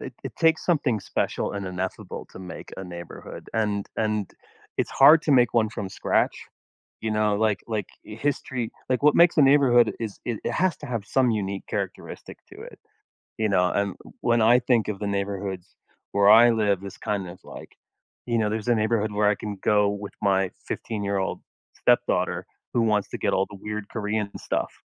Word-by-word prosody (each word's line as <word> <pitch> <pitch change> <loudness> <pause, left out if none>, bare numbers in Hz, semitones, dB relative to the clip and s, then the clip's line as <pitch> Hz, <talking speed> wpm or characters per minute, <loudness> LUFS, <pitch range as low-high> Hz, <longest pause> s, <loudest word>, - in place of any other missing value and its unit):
it 130 - -7
it 135 - -6
takes 160 -1 +3
something 145 - +1
special - - -2
and 100 -1 -4
ineffable 95 +1 -5
to - - -10
make 90 -3 -9
a 95 - -6
neighborhood, 85 -1 -9
and 105 -2 0
and 105 -3 -1 0.5
it's - - -1
hard 150 +4 +7
to 150 - +2
make 120 -2 +4
one 110 -2 +3
from 105 -2 -5
scratch. - - 0 0.6
You 110 - -2
know? 105 -1 +1
Like 110 -2 +1
like, 110 -4 -2 0.2
history 125 0 -3 0.2
like, 130 +2 0
what 150 - +5
makes 170 0 +5
a 150 - +6
neighborhood 130 -5 +5
is 110 -3 -5
it 115 -4 -3
it - - -1
has 185 +1 +1
to 150 - -8
have 115 -5 -3
some 130 -3 +2
unique 100 -2 -2
characteristic - - -5
to - - -12
it. - - -12 0.6
You 110 -1 +1
know, 90 -2 +3
and 100 -2 -1 0.3
when 120 -1 +2
I 120 +3 +6
think 120 -3 +1
of 105 -2 -3
the 105 - -3
neighborhoods 100 -2 -4 0.4
where 100 0 +4
I 115 +2 +8
live, 105 -4 +1
it's 100 - -8
kind 100 -3 -3
of 90 - -11
like, - - -10 0.6
you 120 -1 +1
know, 105 -2 +1
there's 110 +2 -3
a 120 - +4
neighborhood 110 -1 0
where 105 0 +2
I 105 - +2
can 105 -1 -6
go 105 -1 +3
with 100 0 -5
my 95 -2 +2 0.2
15 105 -3 -4
year 100 0 -1
old 95 - -2 0.3
stepdaughter - - +1 0.3
who 120 - +2
wants 105 -3 +1
to - - -5
get - - 0
all 95 +1 +2
the 100 - -10
weird 105 -1 -4
Korean 105 -2 -2
stuff, - - -2
105 Hz, 195 wpm, -25 LUFS, 100-120 Hz, 0.6 s, I